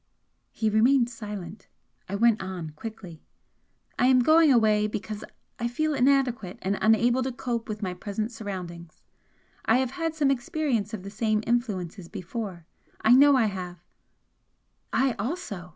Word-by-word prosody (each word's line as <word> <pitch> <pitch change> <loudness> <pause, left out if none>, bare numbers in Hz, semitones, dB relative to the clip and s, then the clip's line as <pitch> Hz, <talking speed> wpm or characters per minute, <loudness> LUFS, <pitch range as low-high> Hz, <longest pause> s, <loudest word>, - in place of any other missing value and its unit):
He 220 - -1
remained 240 +3 +4
silent. 210 -4 -8 0.4
I 200 - -2
went 225 0 +3
on, 185 -4 -5
quickly. 180 -1 -9 0.8
"I 250 - +4
am 255 -1 +5
going 315 +1 +6
away 215 -3 +4
because 210 0 -5 0.4
I 235 - 0
feel 310 +6 -1
inadequate 255 -7 +1
and 195 +1 -1
unable 230 +4 +3
to 260 +1 -1
cope 240 -2 -4
with 210 0 -5
my 185 -2 -2
present 210 +4 -4
surroundings. 180 -7 -8 0.6
I 225 - +4
have 260 -1 0
had 325 +2 -3
some 290 -3 +2
experience 245 - -1
of 190 - -9
the 200 - -8
same 215 0 0
influences 200 -7 -2
before 190 -2 -6 0.4
I 220 - +4
know 280 +2 +7
I 250 -4 +4
have 185 -3 -4 0.7
" - - -47
"I 265 - +1
also!" 200 - -4
220 Hz, 150 wpm, -26 LUFS, 195-250 Hz, 0.8 s, know